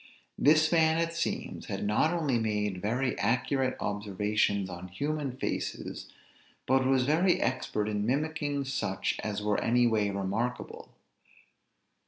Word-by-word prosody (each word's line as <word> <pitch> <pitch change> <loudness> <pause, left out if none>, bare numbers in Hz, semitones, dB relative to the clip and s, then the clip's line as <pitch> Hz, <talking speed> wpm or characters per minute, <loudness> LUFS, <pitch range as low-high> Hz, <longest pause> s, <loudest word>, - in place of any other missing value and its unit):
This 155 +2 +5
man, 160 -1 +4
it 165 0 0
seems, 170 0 -3
had - - -3
not 105 +10 +2
only 150 -8 +1
made 105 -4 -1
very 125 +6 0
accurate 130 +2 +1
observations 105 -1 0
on 90 0 -7
human 145 +8 -3
faces, - - -4 0.5
but 130 0 +3
was 130 -1 +3
very 170 +6 +3
expert 105 -3 -1
in 105 -1 -1
mimicking 145 +1 -1
such 130 -8 -2
as 105 -1 -3
were 105 0 +1
any 120 +1 +3
way 110 -3 +2
remarkable. 100 +5 -3
125 Hz, 130 wpm, -29 LUFS, 105-145 Hz, 0.5 s, This